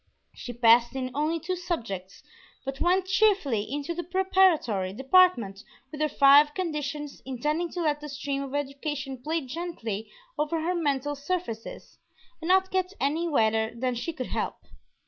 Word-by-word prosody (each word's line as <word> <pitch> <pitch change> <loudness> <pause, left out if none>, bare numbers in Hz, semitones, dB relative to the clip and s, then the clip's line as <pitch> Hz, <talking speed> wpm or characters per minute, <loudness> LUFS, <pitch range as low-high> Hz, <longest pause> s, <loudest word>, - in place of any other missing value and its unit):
She 245 - -7
passed 235 +1 +4
in 255 -1 -3
only 305 +4 0
two 365 +4 -3
subjects, 225 - -5 0.4
but 270 0 -5
went 365 +2 +3
cheerfully 375 - +2
into 290 +3 -3
the 345 +1 -4
preparatory 355 - +2
department 265 - +3 0.3
with 305 - -6
her 305 - +2
five 290 +1 +6
"conditions," 300 -5 -4
intending 300 +7 -2
to 355 - -3
let 300 -2 0
the 300 - -7
stream 275 0 -3
of 275 0 -5
education 275 -2 -4
play 320 +5 -1
gently 255 - -5 0.3
over 310 +2 0
her 345 +3 0
mental 290 -4 0
surfaces 285 -6 -5 0.4
and 325 - -5
not 380 +1 +3
get 375 0 0
any 310 +5 0
wetter 220 -6 +1
than 250 +1 -1
she 240 +8 -3
could 260 -6 -5
help. - - -2
290 Hz, 155 wpm, -27 LUFS, 255-340 Hz, 0.4 s, five